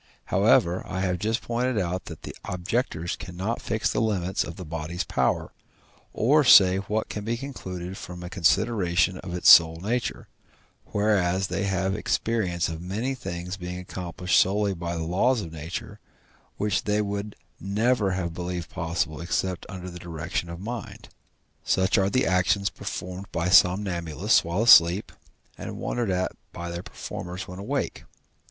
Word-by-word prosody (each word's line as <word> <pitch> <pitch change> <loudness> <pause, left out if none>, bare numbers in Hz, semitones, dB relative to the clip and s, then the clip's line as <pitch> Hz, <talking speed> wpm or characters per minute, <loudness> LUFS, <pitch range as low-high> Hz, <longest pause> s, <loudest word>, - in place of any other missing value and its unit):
However, 85 +2 +4
I 95 0 -3
have 90 -2 0
just 110 +4 -1
pointed 120 +1 -1
out 90 -1 -2
that 80 -3 -10
the - - -7
objectors 90 -2 -2
cannot 90 +7 -4
fix 110 0 -1
the - - 0
limits 95 -5 0
of 85 - -7
the 90 - -8
body's 80 +2 -4
power, - - 0 0.6
or 145 +6 +3
say 95 -7 +8
what 105 +3 -2
can 105 - -5
be 115 +2 -1
concluded 95 -9 -6
from 90 0 -8
a - - -5
consideration 90 -1 +2
of 90 -1 -6
its 90 - +7
sole 80 -1 +8
nature, 95 - -3 0.6
whereas 95 -3 +1
they 100 - -1
have 95 0 0
experience 95 -5 0
of 80 0 -5
many 105 +9 -2
things 90 -6 -5
being 90 -1 -6
accomplished 90 0 -1
solely 100 +1 +2
by 85 -1 -4
the 80 - -2
laws 105 +9 +2
of 80 - -7
nature, 80 +2 -6 0.6
which 105 -1 0
they 105 0 +1
would 100 0 -4 0.2
never 105 +2 +1
have 85 -3 -2
believed 90 -1 -5
possible 80 -1 -2
except 90 +1 -2
under 95 -1 -7
the 90 -1 -8
direction 85 0 -4
of 85 0 -7
mind: 115 +3 -7 0.5
such 95 +1 +2
are 95 0 +2
the 130 +4 +2
actions 95 +2 +2
performed 90 +2 -6
by 85 +2 -1
somnambulists 90 -3 +3
while 85 +6 -1
asleep, 90 -4 +6 0.5
and - - -6
wondered 120 -4 -2
at 90 0 0 0.2
by 85 0 -6
their 85 0 -4
performers 90 +1 -7
when 90 +1 -8
awake. 100 - -3
95 Hz, 160 wpm, -26 LUFS, 85-105 Hz, 0.6 s, say